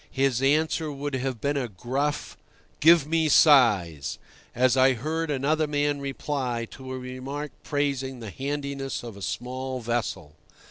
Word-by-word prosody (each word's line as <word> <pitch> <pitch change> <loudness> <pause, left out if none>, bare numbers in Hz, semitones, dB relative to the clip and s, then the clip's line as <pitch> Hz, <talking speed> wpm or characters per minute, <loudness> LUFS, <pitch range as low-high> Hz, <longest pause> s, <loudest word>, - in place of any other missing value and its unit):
His 135 -2 +1
answer 155 +2 +2
would 145 0 -5
have 130 -2 -2
been 145 +3 0
a 130 -3 -1
gruff, 130 +8 -3 0.4
"Give 165 -1 +6
me 160 0 +1
size," 105 - +4 0.4
as 125 +1 +3
I 130 0 +5
heard 155 +6 -2
another 150 +3 +1
man 145 -1 0
reply 135 -3 -2
to 130 -1 -9
a 130 - -3
remark 130 +3 -6
praising 135 -3 -2
the 110 -3 -7
handiness 140 0 -4
of 115 -4 -8
a 100 - -11
small 130 +6 -4
vessel. 115 -10 -3
135 Hz, 145 wpm, -26 LUFS, 125-145 Hz, 0.4 s, Give